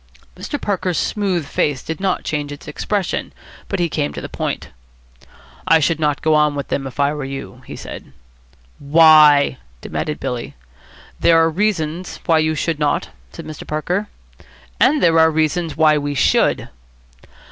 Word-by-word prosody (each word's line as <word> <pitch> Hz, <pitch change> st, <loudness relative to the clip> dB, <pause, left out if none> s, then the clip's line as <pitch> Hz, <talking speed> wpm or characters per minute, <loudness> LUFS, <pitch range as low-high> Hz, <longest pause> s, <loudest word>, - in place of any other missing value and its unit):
Mr. 290 Hz, -, -5 dB
Parker's 185 Hz, -3 st, -1 dB
smooth 190 Hz, -6 st, -1 dB
face 145 Hz, -1 st, -1 dB
did 160 Hz, -, -5 dB
not 190 Hz, -1 st, -1 dB
change 145 Hz, -1 st, -3 dB
its 145 Hz, -, -10 dB
expression, 190 Hz, +5 st, -2 dB, 0.4 s
but 195 Hz, -, -2 dB
he 175 Hz, -, +2 dB
came 150 Hz, -2 st, -2 dB
to -, -, -6 dB
the -, -, -6 dB
point. -, -, -4 dB, 1.0 s
"I 165 Hz, -, +6 dB
should 160 Hz, +1 st, +1 dB
not 150 Hz, -2 st, 0 dB
go 155 Hz, -, +3 dB
on 150 Hz, -1 st, +3 dB
with 140 Hz, -1 st, -5 dB
them 135 Hz, -1 st, -2 dB
if 130 Hz, -, -11 dB
I 140 Hz, +1 st, +2 dB
were 150 Hz, -1 st, -5 dB
you," 135 Hz, 0 st, -7 dB
he -, -, -7 dB
said. -, -, -9 dB, 0.7 s
"Why?" 150 Hz, -, +6 dB, 0.2 s
demanded 150 Hz, -, -4 dB
Billy. 120 Hz, -1 st, -5 dB, 0.6 s
"There 165 Hz, -, +5 dB
are 165 Hz, 0 st, +3 dB
reasons 180 Hz, -2 st, -2 dB
why 160 Hz, -1 st, +3 dB
you 155 Hz, 0 st, +1 dB
should 160 Hz, +1 st, -2 dB
not," 150 Hz, -1 st, 0 dB, 0.2 s
said -, -, -9 dB
Mr. 155 Hz, -1 st, -9 dB
Parker. 180 Hz, +7 st, -2 dB, 0.7 s
"And 300 Hz, +1 st, +3 dB
there 165 Hz, -1 st, +5 dB
are 160 Hz, 0 st, +6 dB
reasons 160 Hz, +1 st, -1 dB
why 155 Hz, -1 st, +4 dB
we 145 Hz, 0 st, -3 dB
should." -, -, +2 dB
155 Hz, 165 wpm, -19 LUFS, 145-170 Hz, 1.0 s, I